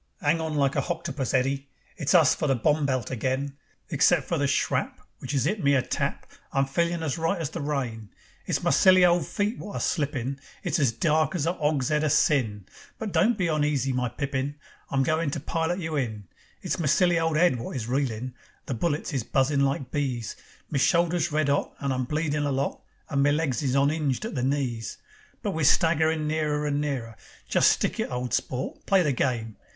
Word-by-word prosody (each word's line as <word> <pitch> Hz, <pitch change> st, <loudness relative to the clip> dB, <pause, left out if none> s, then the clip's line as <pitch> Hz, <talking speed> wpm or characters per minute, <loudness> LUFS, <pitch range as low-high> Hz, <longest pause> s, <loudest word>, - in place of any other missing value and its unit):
"'Ang 160 Hz, +3 st, +2 dB
on 160 Hz, -1 st, -3 dB
like 140 Hz, -2 st, +2 dB
a -, -, +2 dB
hoctopus, 165 Hz, -6 st, -3 dB
Eddy. 135 Hz, +1 st, 0 dB, 0.3 s
It's 155 Hz, +3 st, +1 dB
us 155 Hz, -7 st, +6 dB
for 155 Hz, -, -2 dB
the 135 Hz, -, +3 dB
bomb 145 Hz, +4 st, +1 dB
belt 130 Hz, -3 st, -1 dB
again. 130 Hz, +3 st, -2 dB, 0.3 s
Except 150 Hz, -1 st, +3 dB
for 170 Hz, -, -1 dB
the 140 Hz, -, +2 dB
shrap 135 Hz, -, 0 dB, 0.2 s
Which 135 Hz, +2 st, -4 dB
'as 135 Hz, -2 st, +1 dB
'it 195 Hz, +3 st, -1 dB
me 140 Hz, 0 st, +4 dB
a 130 Hz, -, +2 dB
tap, -, -, -2 dB, 0.3 s
I'm 135 Hz, 0 st, +2 dB
feelin' 170 Hz, +4 st, -1 dB
as 155 Hz, +1 st, -2 dB
right 165 Hz, +4 st, 0 dB
as 160 Hz, -5 st, -3 dB
the 170 Hz, -, -5 dB
rain. 125 Hz, -7 st, -3 dB, 0.4 s
It's -, -, -1 dB
my -, -, +2 dB
silly 185 Hz, -1 st, +6 dB
old 175 Hz, -1 st, +3 dB
feet 210 Hz, +3 st, -1 dB
wot 205 Hz, -, -7 dB
are -, -, -2 dB
slippin', 140 Hz, -4 st, -1 dB, 0.2 s
It's -, -, 0 dB
as 135 Hz, -6 st, +3 dB
dark 155 Hz, +5 st, +1 dB
as 160 Hz, -4 st, 0 dB
a 170 Hz, -, +2 dB
'ogs'ead 150 Hz, -2 st, 0 dB
o' -, -, +2 dB
sin, 125 Hz, -9 st, +2 dB, 0.3 s
But 220 Hz, -2 st, -4 dB
don't 230 Hz, +3 st, +3 dB
be 180 Hz, -, 0 dB
oneasy, 145 Hz, -4 st, +1 dB
my 125 Hz, -1 st, 0 dB
pippin, 140 Hz, +3 st, -3 dB, 0.3 s
I'm 135 Hz, -1 st, +1 dB
goin' 155 Hz, +2 st, +1 dB
to 150 Hz, -, -3 dB
pilot 165 Hz, +4 st, -1 dB
you 160 Hz, -4 st, -3 dB
in. 110 Hz, -6 st, -2 dB, 0.4 s
It's -, -, -2 dB
my 160 Hz, -, 0 dB
silly 175 Hz, +3 st, +3 dB
old 165 Hz, -1 st, +1 dB
'ead 170 Hz, -7 st, +3 dB
wot 115 Hz, -, -6 dB
is 115 Hz, -3 st, -3 dB
reelin'. 125 Hz, -2 st, -2 dB, 0.3 s
The -, -, -3 dB
bullets 150 Hz, +5 st, -2 dB
is 130 Hz, -5 st, -1 dB
buzzin' 140 Hz, +3 st, +1 dB
like 135 Hz, -1 st, -1 dB
bees. 130 Hz, -6 st, -2 dB, 0.4 s
Me 140 Hz, -, +1 dB
shoulder's 170 Hz, +1 st, +2 dB
red 155 Hz, 0 st, +1 dB
'ot, 140 Hz, 0 st, 0 dB
And 140 Hz, -1 st, -1 dB
I'm 130 Hz, 0 st, -1 dB
bleedin' 150 Hz, +1 st, -1 dB
a 145 Hz, -, 0 dB
lot, 135 Hz, +1 st, -2 dB, 0.3 s
And 140 Hz, -1 st, +2 dB
me 145 Hz, +1 st, +4 dB
legs 150 Hz, -3 st, 0 dB
is 135 Hz, -3 st, 0 dB
on'inged 140 Hz, +3 st, +1 dB
at 225 Hz, -, -4 dB
the 130 Hz, -, -2 dB
knees. 130 Hz, -4 st, -2 dB, 0.5 s
But -, -, 0 dB
we're 160 Hz, -, -2 dB
staggerin' 160 Hz, +1 st, +3 dB
nearer 150 Hz, -1 st, 0 dB
and 145 Hz, 0 st, 0 dB
nearer. 130 Hz, -6 st, -3 dB, 0.3 s
Just -, -, +4 dB
stick -, -, -1 dB
it, -, -, -1 dB
old 125 Hz, 0 st, -3 dB
sport, 130 Hz, 0 st, -3 dB
play 195 Hz, -2 st, +4 dB
the 145 Hz, -3 st, +1 dB
game. 115 Hz, -4 st, -1 dB
145 Hz, 210 wpm, -26 LUFS, 130-160 Hz, 0.5 s, us